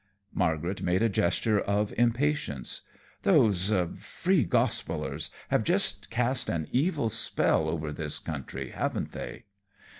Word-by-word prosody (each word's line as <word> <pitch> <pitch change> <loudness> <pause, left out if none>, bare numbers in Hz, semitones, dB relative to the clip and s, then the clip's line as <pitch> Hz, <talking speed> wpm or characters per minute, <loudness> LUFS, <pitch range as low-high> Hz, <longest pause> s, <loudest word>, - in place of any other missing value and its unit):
Margaret 85 +1 -1
made 90 +4 +1
a 115 - +3
gesture 100 +3 +1
of 100 +1 0
impatience. 120 - 0 0.4
"Those 100 -1 +4 0.3
Free 185 -5 +1
Gospellers 90 - 0 0.2
have - - +2
just - - +1
cast 125 +2 +1
an 80 -3 -2
evil 145 -3 +1
spell 80 -7 +2
over 80 -2 -3
this 75 -1 0
country, 65 -3 -6
haven't - - -2
they?" - - -7
100 Hz, 120 wpm, -28 LUFS, 80-120 Hz, 0.4 s, Those